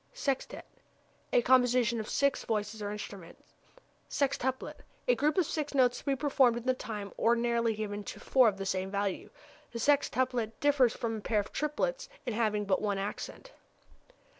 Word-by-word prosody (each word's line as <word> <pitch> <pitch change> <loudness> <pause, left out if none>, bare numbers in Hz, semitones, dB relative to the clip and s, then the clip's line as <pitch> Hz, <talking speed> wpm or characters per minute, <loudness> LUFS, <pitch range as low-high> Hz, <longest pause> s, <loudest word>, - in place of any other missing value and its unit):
Sextet 275 - -2 0.7
a - - +4
composition 245 -3 +3
for 215 - -8
six 280 0 +1
voices 215 0 -2
or 205 - -3
instruments. 200 -4 -8 0.7
Sextuplet 260 -2 -1 0.3
a - - +5
group 300 -3 +1
of 365 - +4
six 295 -1 -3
notes 250 -2 +3
to - - -16
be 275 -2 +1
performed 265 -4 +3
in 240 - -6
the 255 - +3
time 210 -5 -6
ordinarily 235 -1 +2
given 205 -1 -4
to - - -7
four 255 -3 +4
of 200 -3 +1
the 195 - -4
same 190 0 -1
value. 200 -1 -2 0.4
The 235 - -5
sextuplet 250 -4 +1
differs 280 -5 +3
from 225 -1 -2
a - - -7
pair 215 0 +1
of 205 - -4
triplets 400 +12 -2 0.2
in 245 - -2
having 215 -2 0
but 195 -1 +1
one 205 -2 0
accent. 205 - -5
235 Hz, 170 wpm, -31 LUFS, 210-270 Hz, 0.7 s, a